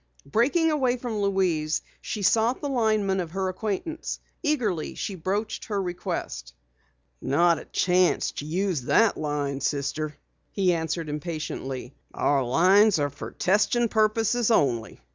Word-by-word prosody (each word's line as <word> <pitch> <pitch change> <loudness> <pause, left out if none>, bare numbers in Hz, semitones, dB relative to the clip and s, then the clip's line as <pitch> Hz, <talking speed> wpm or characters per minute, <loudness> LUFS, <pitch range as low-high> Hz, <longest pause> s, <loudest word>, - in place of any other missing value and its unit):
Breaking 285 - +2
away 260 -4 +1
from 235 -4 -3
Louise, 180 -6 +1 0.2
she 210 - -4
sought 225 +5 +3
the 290 - -3
lineman 215 -6 +1
of 175 -3 -3
her 190 +2 -2
acquaintance. 215 - -4 0.2
Eagerly 235 - -1
she 200 - -4
broached 195 +5 -3
her 205 -2 -2
request. 65 - -4 0.7
"Not 165 +4 +3
a - - -11
chance 180 0 +2
to 145 - -4
use 180 -2 0
that 225 - +4
line, 145 -2 -2
Sister," 145 +2 -2 0.3
he 185 -3 +2
answered 160 0 -2
impatiently. 150 -4 -5 0.2
"Our 140 -1 +2
'phones 185 - +4
are 145 -1 0
for 140 - -7
testing 210 +5 +2
purposes 225 +2 +2
only." 120 - +1
185 Hz, 135 wpm, -26 LUFS, 150-220 Hz, 0.7 s, that